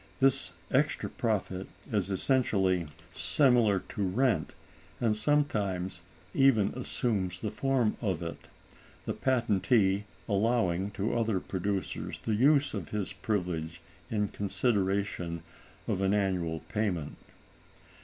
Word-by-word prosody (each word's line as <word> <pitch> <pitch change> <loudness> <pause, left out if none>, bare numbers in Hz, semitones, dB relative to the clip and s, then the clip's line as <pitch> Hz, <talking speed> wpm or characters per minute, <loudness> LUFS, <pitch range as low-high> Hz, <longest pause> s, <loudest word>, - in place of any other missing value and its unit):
This 135 -9 +3 0.2
extra 140 +3 +1
profit 105 -6 -1 0.2
is 100 -3 0
essentially 95 - +2 0.3
similar 105 - +3
to - - -4
rent, 100 - +1 0.4
and 110 -3 +2
sometimes 105 -9 0 0.3
even 125 -7 +4
assumes 100 -7 -2
the 105 - -3
form 125 -1 +1
of 95 -7 -1
it, 85 - -7 0.6
the - - -1
patentee 105 -5 +2 0.2
allowing 100 -3 +1
to 105 +4 0
other 110 -4 +1
producers 95 -1 -3
the 110 - 0
use 140 +5 +4
of 95 -8 -4
his 105 -3 -3
privilege 90 -6 -2 0.3
in 105 -2 0
consideration 100 -5 -1 0.4
of 95 - 0
an 95 +1 +3
annual 90 -5 0
payment. 95 -9 -2
100 Hz, 110 wpm, -30 LUFS, 95-120 Hz, 0.6 s, even